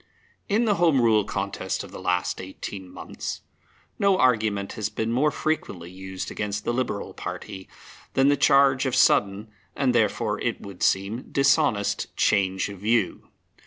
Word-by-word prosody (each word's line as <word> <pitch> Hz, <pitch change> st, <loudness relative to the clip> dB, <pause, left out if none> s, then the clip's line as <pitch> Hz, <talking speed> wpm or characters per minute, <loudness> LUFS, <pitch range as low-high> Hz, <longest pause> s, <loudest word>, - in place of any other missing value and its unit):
In 220 Hz, +4 st, +2 dB
the 210 Hz, -3 st, +2 dB
Home 160 Hz, -6 st, +4 dB
Rule 110 Hz, -3 st, +4 dB
contest 100 Hz, -1 st, -3 dB
of -, -, -11 dB
the -, -, -9 dB
last 90 Hz, 0 st, -1 dB
eighteen 95 Hz, 0 st, -8 dB
months -, -, -6 dB, 0.6 s
no 200 Hz, -1 st, +3 dB
argument 110 Hz, -, +1 dB
has 110 Hz, -1 st, -3 dB
been 110 Hz, +1 st, -2 dB
more 135 Hz, +6 st, +3 dB
frequently 125 Hz, -, -3 dB
used 95 Hz, 0 st, -7 dB
against 105 Hz, 0 st, -4 dB
the 120 Hz, -, 0 dB
Liberal 110 Hz, -6 st, -3 dB
party 95 Hz, +2 st, -7 dB, 0.5 s
than 135 Hz, +1 st, +4 dB
the 145 Hz, -, +5 dB
charge 135 Hz, -1 st, +4 dB
of 130 Hz, -, -1 dB
sudden, 105 Hz, -4 st, +3 dB, 0.2 s
and 130 Hz, -3 st, +1 dB
therefore, 110 Hz, -2 st, +1 dB
it 120 Hz, -, -1 dB
would 100 Hz, -3 st, -11 dB
seem, 100 Hz, +6 st, 0 dB
dishonest 140 Hz, -6 st, +1 dB
change 95 Hz, -2 st, +2 dB
of 100 Hz, -2 st, -9 dB
view. 110 Hz, +4 st, 0 dB
105 Hz, 155 wpm, -25 LUFS, 95-130 Hz, 0.6 s, the